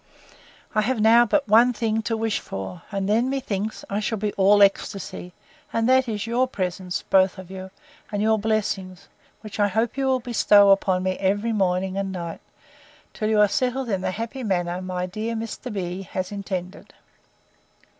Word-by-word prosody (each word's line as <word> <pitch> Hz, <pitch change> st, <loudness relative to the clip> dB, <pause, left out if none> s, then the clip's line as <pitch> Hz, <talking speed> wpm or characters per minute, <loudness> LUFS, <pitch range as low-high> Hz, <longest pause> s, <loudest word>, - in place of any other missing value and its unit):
I 215 Hz, -, +3 dB
have 240 Hz, +2 st, -1 dB
now 230 Hz, +2 st, +6 dB
but 285 Hz, +5 st, +1 dB
one 235 Hz, +4 st, +5 dB
thing 225 Hz, -1 st, -1 dB
to 225 Hz, -, 0 dB
wish 225 Hz, -1 st, -1 dB
for; 95 Hz, -2 st, -7 dB
and 195 Hz, -1 st, -2 dB
then, 230 Hz, +5 st, +2 dB
methinks, 220 Hz, -6 st, -3 dB
I 200 Hz, -, -2 dB
shall 220 Hz, +1 st, -2 dB
be 210 Hz, 0 st, -2 dB
all 200 Hz, +1 st, +5 dB
ecstasy: 195 Hz, -2 st, -1 dB, 0.4 s
and 230 Hz, 0 st, 0 dB
that 260 Hz, -1 st, +4 dB
is, 210 Hz, -1 st, -3 dB
your 240 Hz, +3 st, +1 dB
presence, 185 Hz, -4 st, -3 dB
both 190 Hz, 0 st, +4 dB
of 185 Hz, -1 st, -10 dB
you, 190 Hz, 0 st, -7 dB, 0.4 s
and 205 Hz, -, -2 dB
your 220 Hz, +1 st, +2 dB
blessings; 200 Hz, -4 st, -2 dB, 0.3 s
which 215 Hz, -1 st, -9 dB
I 205 Hz, -, +4 dB
hope 220 Hz, +5 st, -1 dB
you 270 Hz, -1 st, 0 dB
will 260 Hz, -1 st, +2 dB
bestow 205 Hz, -4 st, +5 dB
upon 190 Hz, -2 st, +2 dB
me 185 Hz, 0 st, -1 dB
every 205 Hz, +4 st, 0 dB
morning 190 Hz, -2 st, 0 dB
and 195 Hz, -1 st, -2 dB
night, 170 Hz, -3 st, -6 dB, 0.7 s
till 215 Hz, -1 st, -2 dB
you 215 Hz, -1 st, +3 dB
are 210 Hz, -, +6 dB
settled 255 Hz, +3 st, -1 dB
in 195 Hz, -3 st, -1 dB
the -, -, -1 dB
happy 230 Hz, +7 st, -5 dB
manner 180 Hz, -3 st, -1 dB
my 180 Hz, -1 st, -3 dB
dear 215 Hz, +5 st, -4 dB
Mr. 230 Hz, +3 st, -5 dB
B—— 185 Hz, -2 st, -4 dB
has 185 Hz, 0 st, -5 dB
intended. 190 Hz, -2 st, -6 dB
205 Hz, 180 wpm, -24 LUFS, 190-225 Hz, 0.7 s, now